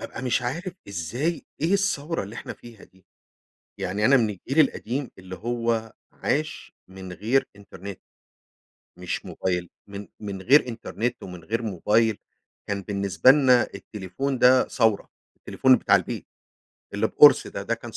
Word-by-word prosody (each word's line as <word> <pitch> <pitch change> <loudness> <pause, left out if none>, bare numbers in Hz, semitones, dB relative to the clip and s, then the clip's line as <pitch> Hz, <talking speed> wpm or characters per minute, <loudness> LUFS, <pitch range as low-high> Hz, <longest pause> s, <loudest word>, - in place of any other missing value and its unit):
بابقى 125 - -7
مش 125 -2 0
عارف 170 +10 -3 0.2
إزاي 115 - -3 0.2
إيه 165 +5 +1
الثوّرة 175 - 0
اللي 100 +3 -9
إحنا - - -7
فيها 115 -4 -14
دي؟ 95 -1 -27 0.7
يعني 100 +4 -2
أنا 135 +5 +6
من 115 -4 +2
الجيل 130 - -1
القديم 130 +2 -5
اللي 95 0 -9
هو 115 +1 -2 0.2
عاش 155 +2 -3 0.2
من 95 -1 -9
غير 115 +8 +1
إنترنت، 100 -1 -10 1.0
مش - - -4
موبايل، 90 -2 -3 0.2
من 100 0 -9
من 100 -3 -6
غير 135 +3 +5
إنترنت 115 0 -4
ومن 90 -3 -9
غير 115 +5 -2
موبايل، 110 +2 +1 0.5
كان 100 -1 -2
بالنسبة 100 +4 +3
لنا 130 -3 +5
التليفون 110 +7 -4
ده 130 +1 +5
ثوّرة، 110 -5 +1 0.3
التليفون 130 -1 +3
بتاع 100 - +4
البيت، 90 - -4 0.7
اللي - - +1
بقُرص - - +6
ده، - - -6
ده - - -1
كان - - -10
115 Hz, 145 wpm, -25 LUFS, 100-130 Hz, 1.0 s, أنا